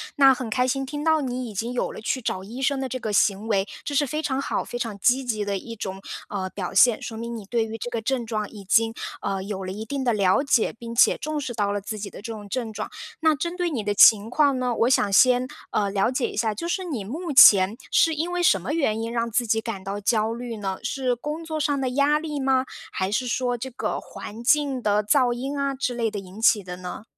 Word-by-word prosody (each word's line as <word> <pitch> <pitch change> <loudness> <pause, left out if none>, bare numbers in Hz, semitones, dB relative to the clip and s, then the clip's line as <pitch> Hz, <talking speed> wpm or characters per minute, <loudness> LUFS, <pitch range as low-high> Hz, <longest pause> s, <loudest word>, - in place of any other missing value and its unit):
那 275 -2 +7
很 250 -3 -5
开 250 +3 +1
心 270 +1 -1
听 295 +2 -5
到 320 -1 +3
你 250 -3 -3
已 - - -9
经 230 +5 -3
有 245 - -1
了 - - -9
去 255 +4 -2
找 190 -4 -3
医 240 +6 -7
生 275 0 +1
的 265 - -2
这 255 - -4
个 220 -4 -4
行 205 +1 +2
为， 195 -1 +1 0.2
这 290 - -4
是 285 0 +2
非 305 +4 -2
常 275 -2 -1
好， - - -2
非 240 - -6
常 225 -4 -4
积 255 +6 +2
极 215 -4 -1
的 200 -1 -2
一 230 +4 -8
种， 195 -2 -6 0.3
嗯， 190 -2 -3
表 185 -2 -4
现。 215 +4 +5
说 225 - -6
明 235 +1 -5
你 220 - -7
对 225 +2 -1
于 225 0 -6
这 245 - -5
个 230 -2 -3
症 245 +1 -1
状 215 -2 -3
已 210 -3 -11
经， 225 +3 +3 0.3
嗯， 195 -1 -3
有 195 -2 -5
了 185 - -4
一 215 +2 -6
定 275 +4 -4
的 240 - +3
了 195 +3 +3
解， 265 -5 +2
并 230 +1 -9
且 - - +5
重 305 -1 -3
视 250 -3 -4
到 205 -2 0
了 205 - -2
自 215 +1 -6
己 200 0 -5
的 - - -11
这 230 +1 -6
种 210 -2 -8
症 230 +1 -3
状。 215 0 -5 0.3
那 315 -1 +3
针 340 +5 -4
对 355 -1 0
你 245 -9 -3
的 205 0 0
情 210 +1 +7
况 280 -1 +3
呢， 250 -1 0
我 235 +2 +2
想 205 -6 +2
先， 250 +4 +5 0.3
嗯， 200 -1 0
了 195 +3 +2
解 255 -1 -1
一 - - -9
下， 220 -2 +1
就 340 +9 -4
是 375 +1 -1
你 275 - -4
目 300 - -5
前， 200 -5 +8 0.2
是 325 - +4
因 325 +3 -2
为 355 - -1
什 195 - +4
么 245 - -4
原 225 -9 0
因 230 +1 -4
让 235 0 -1
自 235 +2 +1
己 220 0 +1
感 220 -4 -5
到 200 +1 -4
焦 220 +2 +1
虑 235 -1 -6
呢？ 195 -2 -3
是 250 0 -1
工 300 +6 -5
作 315 -1 -4
上 285 -1 0
的 255 - 0
压 285 +3 +2
力 300 -2 -4
吗？ 265 -1 +2 0.3
还 190 +1 -2
是 250 +4 0
说 245 0 -1
这 265 +3 -5
个 - - -3
环 225 +3 -9
境 280 -1 +2
的 210 -1 +2
噪 245 +2 +3
音 270 +4 -4
啊， 280 0 0
之 255 -2 -2
类 230 -2 0
的 205 - -4
引 195 +2 -11
起 215 -3 +4
的 180 0 -7
呢？ 180 +2 -7
235 Hz, 285 characters per minute, -24 LUFS, 210-270 Hz, 0.3 s, 前